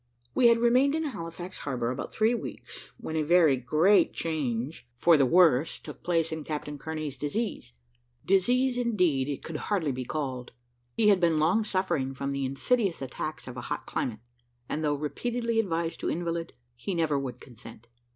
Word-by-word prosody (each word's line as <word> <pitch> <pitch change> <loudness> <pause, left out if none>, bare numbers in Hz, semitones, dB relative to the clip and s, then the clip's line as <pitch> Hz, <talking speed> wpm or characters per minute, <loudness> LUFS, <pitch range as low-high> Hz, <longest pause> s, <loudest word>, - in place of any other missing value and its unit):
We 240 - +5
had 235 0 +6
remained 250 +5 +4
in 320 - -1
Halifax 175 - -6
harbour 125 -4 -2
about 130 - -5
three 220 +2 +2
weeks, 240 - -7
when 160 - -6
a 160 - +2
very 160 -2 +5
great 155 - +3
change 135 -4 -3
for 170 +6 +5
the 140 -3 +4
worse 165 -3 +4
took - - -11
place 165 -2 +1
in 160 -1 -4
Captain 150 -1 -5
Kearney's 155 -4 -5
disease. 150 - -3 0.5
Disease, 245 +7 +3
indeed, 180 - +1
it 140 - -4
could 160 -2 -5
hardly 175 -7 -1
be 130 0 -4
called. 130 -3 -4 0.4
He 215 -2 +5
had 200 -2 +5
been 170 -3 +3
long 170 +8 +3
suffering 185 -10 -1
from 140 +1 -3
the 140 -1 -1
insidious 190 - 0
attacks 135 +3 -5
of 125 0 -7
a - - -4
hot - - -3
climate, 110 -4 -3 0.5
and 155 - -3
though 145 -1 +1
repeatedly 230 - -2
advised 170 -5 -1
to - - -2
invalid, 170 0 -3 0.2
he 175 +10 -4
never 155 -4 +1
would 125 -3 -5
consent. 115 -1 -13
160 Hz, 175 wpm, -28 LUFS, 135-195 Hz, 0.5 s, had